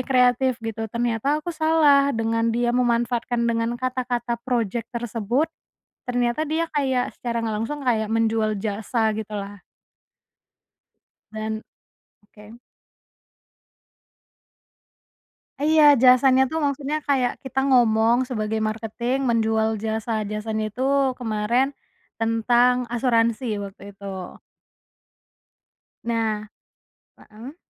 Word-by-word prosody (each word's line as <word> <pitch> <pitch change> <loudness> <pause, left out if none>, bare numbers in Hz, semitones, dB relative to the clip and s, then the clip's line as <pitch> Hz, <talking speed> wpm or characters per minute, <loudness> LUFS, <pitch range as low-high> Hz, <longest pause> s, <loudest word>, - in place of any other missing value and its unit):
kreatif 255 -1 +2
gitu 225 0 -4
ternyata 235 +5 0
aku 345 - -3
salah 310 -3 +4
dengan 230 0 0
dia 240 +1 +1
memanfaatkan 240 -1 0
dengan 230 0 0
kata-kata 245 -2 -2
projek 235 -2 -2
tersebut, 235 +3 -1 0.6
ternyata 245 +5 0
dia 320 +2 0
kayak 265 -4 0
secara 235 -1 -2
nggak 220 -1 -2
langsung 280 +5 -4
kayak 220 -4 +1
menjual 220 -1 +1
jasa 220 +2 -1
gitulah. 205 -2 -6 1.7
Dan 220 0 -4 0.6
oke. 210 +3 -15 3.0
Eh, 295 - 0
iya 315 -1 +6 0.2
jasanya 255 +1 +6
itu 265 - -6
maksudnya 285 +1 -1
kayak 260 -3 +2
kita 265 0 -2
ngomong 230 -2 +4
sebagai 220 -2 -2
marketing 225 +3 -2
menjual 220 -1 +2
jasa-jasanya 220 -1 -2
itu 215 +5 -8 0.4
kemarin, 225 +2 +1 0.5
tentang 235 +2 +3 0.2
asuransi 235 0 +1 0.2
waktu 200 -1 -10
itu. 200 0 -19 2.0
Nah 220 -2 -1 0.7
heeh. 240 +9 -12
235 Hz, 95 wpm, -23 LUFS, 220-255 Hz, 3.0 s, iya